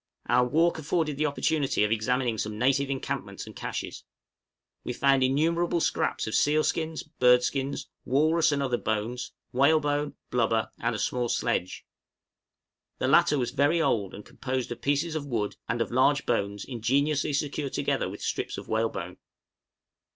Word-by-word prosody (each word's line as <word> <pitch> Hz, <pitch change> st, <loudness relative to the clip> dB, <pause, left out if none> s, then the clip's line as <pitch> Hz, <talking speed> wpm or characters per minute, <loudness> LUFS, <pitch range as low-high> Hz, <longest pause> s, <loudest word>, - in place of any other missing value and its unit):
Our 125 Hz, 0 st, +3 dB
walk 165 Hz, +5 st, +2 dB
afforded 155 Hz, -1 st, -1 dB
the 155 Hz, +1 st, +1 dB
opportunity 145 Hz, -4 st, +1 dB
of 105 Hz, -, +1 dB
examining 120 Hz, +1 st, 0 dB
some 105 Hz, +1 st, -3 dB
native 135 Hz, +3 st, +2 dB
encampments 135 Hz, -1 st, -4 dB
and -, -, -11 dB
câches. -, -, -5 dB, 0.8 s
We 125 Hz, -, -3 dB
found 135 Hz, +1 st, +3 dB
innumerable 165 Hz, +6 st, +2 dB
scraps -, -, 0 dB
of 110 Hz, -, -4 dB
seal 150 Hz, +4 st, +3 dB
skins, 160 Hz, -1 st, -2 dB
bird 125 Hz, -5 st, +4 dB
skins, 135 Hz, +2 st, -2 dB, 0.2 s
walrus 155 Hz, +5 st, +3 dB
and 140 Hz, -1 st, 0 dB
other 125 Hz, -3 st, 0 dB
bones, 110 Hz, +3 st, -2 dB, 0.2 s
whalebone, 145 Hz, +2 st, +2 dB, 0.2 s
blubber, 115 Hz, -2 st, +1 dB
and 115 Hz, 0 st, -1 dB
a -, -, -2 dB
small 120 Hz, +3 st, -1 dB
sledge. 90 Hz, -, -1 dB, 1.1 s
The -, -, -1 dB
latter 150 Hz, -, +5 dB
was 125 Hz, -2 st, -1 dB
very 145 Hz, +5 st, +2 dB
old, 105 Hz, -, 0 dB
and 105 Hz, -, -10 dB
composed 130 Hz, -2 st, -4 dB
of 120 Hz, -, -6 dB
pieces 145 Hz, +4 st, 0 dB
of 150 Hz, -2 st, -4 dB
wood 110 Hz, -6 st, -2 dB
and 115 Hz, +1 st, 0 dB
of -, -, -1 dB
large 140 Hz, +4 st, +3 dB
bones 100 Hz, -3 st, -1 dB
ingeniously 140 Hz, +5 st, 0 dB
secured 140 Hz, -1 st, -2 dB
together -, -, 0 dB
with -, -, -8 dB
strips -, -, -2 dB
of -, -, -8 dB
whalebone. 110 Hz, -5 st, -2 dB
135 Hz, 160 wpm, -27 LUFS, 120-150 Hz, 1.1 s, latter